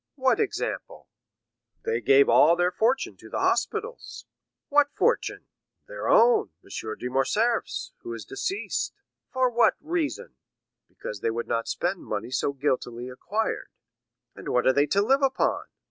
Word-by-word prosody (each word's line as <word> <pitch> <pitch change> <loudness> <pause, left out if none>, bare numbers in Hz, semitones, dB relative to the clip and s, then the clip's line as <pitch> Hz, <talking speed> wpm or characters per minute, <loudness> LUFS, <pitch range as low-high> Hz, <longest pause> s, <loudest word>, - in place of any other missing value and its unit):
"What 260 -2 +2
example?" 445 +3 -3 0.8
"They 455 0 0
gave 140 +1 +5
all 165 +3 +6
their 175 +1 +1
fortune 235 +8 0
to - - -14
the - - -4
hospitals." 435 +3 -2 0.4
"What 290 0 +4
fortune?" - - 0 0.4
"Their - - -5
own—M. 110 - +2
de 125 - -4
Morcerf's, 135 - 0
who 115 - -8
is 110 -4 -8
deceased." 380 - -3 0.4
"For 260 -1 +2
what 240 0 +4
reason?" 320 -1 -3 0.6
"Because 105 - -7
they 115 - 0
would 115 +1 -3
not 115 -1 -1
spend 180 +1 -1
money 110 +3 -4
so 135 - 0
guiltily 130 -3 -2
acquired." 205 +12 -3 0.6
"And - - -8
what 125 - +1
are 130 - +5
they 140 +2 +3
to 200 +5 +2
live 270 +6 +3
upon?" 265 -1 +1
180 Hz, 145 wpm, -26 LUFS, -, 0.8 s, all